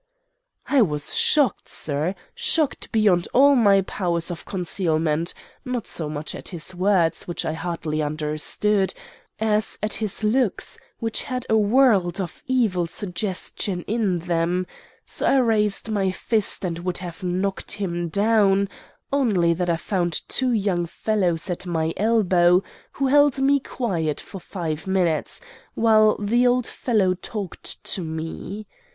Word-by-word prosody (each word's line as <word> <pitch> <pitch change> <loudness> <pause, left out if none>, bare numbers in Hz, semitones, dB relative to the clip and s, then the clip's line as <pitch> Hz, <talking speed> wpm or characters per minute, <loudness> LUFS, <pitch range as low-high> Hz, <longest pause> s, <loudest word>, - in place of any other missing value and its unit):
"I 280 -3 +4
was 150 -8 +1
shocked, 285 -9 +3
sir, 155 +5 -2 0.2
shocked 310 -4 0
beyond 205 -6 +3
all 280 +3 +7
my 200 -5 +5
powers 175 -3 -1
of 170 - -7
concealment, 165 -3 -1 0.3
not 250 -3 -3
so 155 -3 -3
much 150 0 -4
at - - -8
his 175 +1 -3
words, 185 -2 +1
which 175 - -3
I 155 - -1
hardly 160 -2 -3
understood, 155 +7 0 0.4
as 215 0 0
at 215 - 0
his 215 -1 -1
looks, 220 -1 +1 0.2
which 225 -1 -2
had 255 -2 -4
a - - +5
world 210 -5 +3
of 180 -4 -5
evil 220 -10 +1
suggestion 185 0 -3
in 210 -5 0
them; 175 +1 0 0.4
so - - -1
I 270 - +4
raised 220 -4 +1
my 200 -3 +1
fist 205 +1 -1
and 170 -2 -3
would 180 0 -2
have 175 0 -8
knocked 185 +2 -2
him 175 -4 -3
down, 200 0 +3 0.4
only 200 -12 +3
that 175 +1 -2
I 170 - +2
found 175 -3 -2
two 260 -1 0
young 195 -6 0
fellows 180 -4 0
at 180 0 -4
my 165 -1 -1
elbows, 185 -4 +3 0.3
who 275 - -1
held 285 0 +4
me 280 +1 +4
quiet 175 - -2
for 195 - -9
five 160 -3 -5
minutes, 180 -5 0 0.3
while 215 -1 +4
the 235 +4 +2
old 245 0 +2
fellow 210 -8 +1
talked 195 +1 -6
to 190 - -3
me. 165 +6 -5
190 Hz, 145 wpm, -23 LUFS, 170-220 Hz, 0.4 s, all